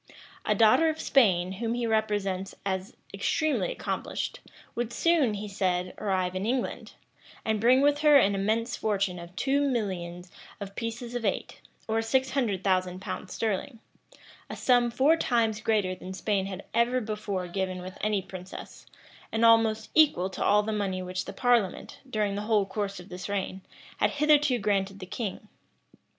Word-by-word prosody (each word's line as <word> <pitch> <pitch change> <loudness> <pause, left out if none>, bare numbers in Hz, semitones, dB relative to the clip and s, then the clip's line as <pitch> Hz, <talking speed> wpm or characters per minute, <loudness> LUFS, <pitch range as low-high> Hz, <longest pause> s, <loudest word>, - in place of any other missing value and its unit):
[] - - -22
A - - +3
daughter 230 +9 +5
of 315 0 -3
Spain, 185 -9 +3
whom 230 +4 -2
he 240 -1 -1
represents 205 -4 -1
as 190 0 -3 0.2
extremely 310 - 0
accomplished, - - -4 0.3
would 240 -1 -3
soon, 295 -6 +2
he 205 +1 -5
said, 185 -2 -1
arrive 185 -3 -1
in 185 - -2
England, 245 +4 -2 0.5
and 220 -1 0
bring 250 +3 +5
with 290 +1 +3
her 300 -1 +7
an 200 -7 +4
immense 220 +5 0
fortune 195 -4 -1
of 170 +1 -11
two 275 +5 +1
millions 185 -9 -2 0.3
of 200 -1 -7
pieces 235 +1 -5
of 245 -1 -3
eight, - - -2 0.3
or 225 0 +1
six 260 +4 +1
hundred 215 -9 0
thousand 185 -1 +1
pounds 190 -1 -6
sterling; 225 +3 -2 0.7
a - - -5
sum 245 -2 +3
four 265 +7 +4
times 225 -7 +1
greater 210 -5 +1
than 185 0 -8
Spain 195 0 -1
had 195 0 -7
ever 235 +2 +2
before 210 -5 -3
given 185 0 -3
with 185 +1 -9
any 210 -2 0
princess, 185 0 -10 0.4
and 225 +1 +2
almost 225 -1 +4
equal 235 - +4
to - - -3
all 210 +1 +4
the 220 - -2
money 190 -3 -2
which 185 0 -4
the - - -6
parliament, 240 -7 +1
during 210 -4 0
the 200 - -3
whole 210 -3 +3
course 200 0 -4
of 180 - -12
this 180 +2 -7
reign, 195 -1 -3 0.4
had - - +3
hitherto 295 -3 +3
granted 200 -2 0
to - - -13
the 185 - -7
king. 210 +1 -5
210 Hz, 170 wpm, -28 LUFS, 190-235 Hz, 0.7 s, her